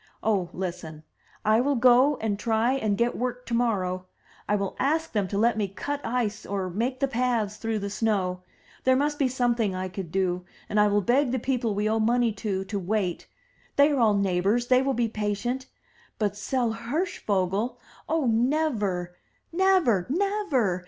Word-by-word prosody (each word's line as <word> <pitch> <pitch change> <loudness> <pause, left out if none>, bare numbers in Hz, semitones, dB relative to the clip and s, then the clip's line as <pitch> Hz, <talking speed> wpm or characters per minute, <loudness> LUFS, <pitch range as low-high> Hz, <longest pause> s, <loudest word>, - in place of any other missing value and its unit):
Oh, 195 -5 +1
listen; 170 -4 -6 0.4
I 215 +2 +4
will 280 +2 +1
go 255 +3 +5
and 210 -2 -1
try 225 +2 +1
and 215 -7 0
get 235 +1 +1
work 250 0 -3
tomorrow! 195 -6 -1 0.4
I 210 - +3
will 200 -2 -2
ask 320 +4 +1
them 205 -3 0
to 200 - -3
let 230 +1 +3
me 205 - +1
cut 285 +9 -4
ice 225 -4 -1
or 190 -2 -3
make 240 +7 -2
the 275 - +2
paths 235 -5 0
through 225 0 -2
the 200 -1 -3
snow. 195 -4 0 0.4
There 260 0 +4
must 290 +2 0
be 275 - +3
something 240 -5 0
I 185 0 -3
could 185 -3 -6
do, 180 -1 0 0.2
and 210 - 0
I 210 - +5
will 205 0 +2
beg 255 +5 +3
the 260 - 0
people 240 -4 -1
we 210 +1 0
owe 220 +1 +1
money 235 +1 +2
to 195 -2 -3
to 200 0 -3
wait; 190 -1 -2 0.5
they 285 +2 +5
are 280 - +1
all 220 -3 +4
neighbors, 200 +5 +1
they 255 0 +5
will 270 0 0
be 235 -1 +1
patient. 220 +4 -2 0.5
But 205 -2 0
sell 235 +3 -1
Hirschvogel! 230 - -1 0.2
— - - -24
oh, 320 -3 +1
never! 225 - 0 0.4
never! 345 - +3
never! 315 - +1
225 Hz, 180 wpm, -26 LUFS, 200-255 Hz, 0.5 s, go